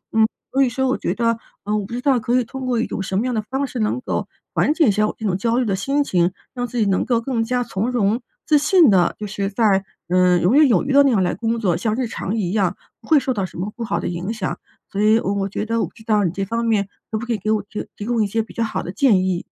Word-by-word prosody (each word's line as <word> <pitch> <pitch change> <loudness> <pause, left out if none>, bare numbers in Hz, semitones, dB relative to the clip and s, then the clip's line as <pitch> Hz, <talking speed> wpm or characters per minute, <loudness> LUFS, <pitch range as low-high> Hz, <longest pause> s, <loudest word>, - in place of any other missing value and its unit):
嗯， 220 0 +5 0.2
所 270 - +2
以 260 - +4
说 265 +2 -1
我 - - +1
觉 - - -1
得 230 -1 +1 0.3
嗯， 210 +1 0
我 200 - -4
不 235 - -9
知 245 - -2
道 270 -3 +3
可 245 +2 +1
以 - - +1
通 265 +3 -7
过 240 -2 +1
一 - - +1
种 - - -4
什 190 0 -2
么 230 - +1
样 250 - -1
的 215 - 0
方 265 +6 -2
式 255 -2 -6
能 215 +4 0
够 - - -3 0.3
缓 - - +2
解 320 - +4
一 - - +5
下 210 +1 +2
我 - - -5
这 220 - -6
种 185 -3 +1
焦 230 +5 0
虑 255 - +2
的 195 -2 0
心 275 +9 0
情， 175 -6 +1 0.2
让 245 -1 -3
自 245 - -6
己 215 - +3
能 195 -1 +1
够 235 -2 +2
更 230 -2 -1
加 245 +1 0
从 220 +2 -2
容、 230 0 +1 0.2
自 300 -2 +4
信 310 - +5
地， 180 -3 +3
就 210 - -5
是 200 -1 -3
在， 200 -2 +2 0.3
嗯， 180 -1 +4
游 190 +8 +3
刃 295 0 +6
有 235 - +3
余 275 - -1
地 285 - +7
那 280 - +4
样 200 -6 +2
来 175 - 0
工 230 0 -1
作， 180 -6 +1
像 215 +4 -1
日 255 -1 -1
常 220 -2 -4
一 185 -4 -1
样 195 -4 0 0.2
不 - - -17
会 310 -3 +5
受 260 -1 -1
到 195 -4 -2
什 - - -13
么 200 +4 -4
不 235 - -5
好 170 -6 -1
的 - - -3
影 175 +4 -3
响。 215 -5 -3 0.3
所 200 - -4
以 220 +2 +5
我 200 -1 -1
我 195 0 -1
觉 210 - -4
得 230 0 0
我 - - +1
不 - - -13
知 220 - -16
道 210 -2 +2
你 170 - +1
这 195 +1 -3
方 230 +3 -2
面 205 -3 +1 0.2
可 215 - -1
不 235 - -5
可 - - -2
以 - - -1
给 215 +3 -2
我 210 -2 +1
这 210 - -5
提 205 - -7
供 235 -3 +1
一 - - 0
些 225 +3 0
比 220 - -11
较 230 - 0
好 220 - -2
的 180 - -6
建 200 -3 +3
议？ 185 -2 -1
220 Hz, 340 characters per minute, -21 LUFS, 195-245 Hz, 0.3 s, 地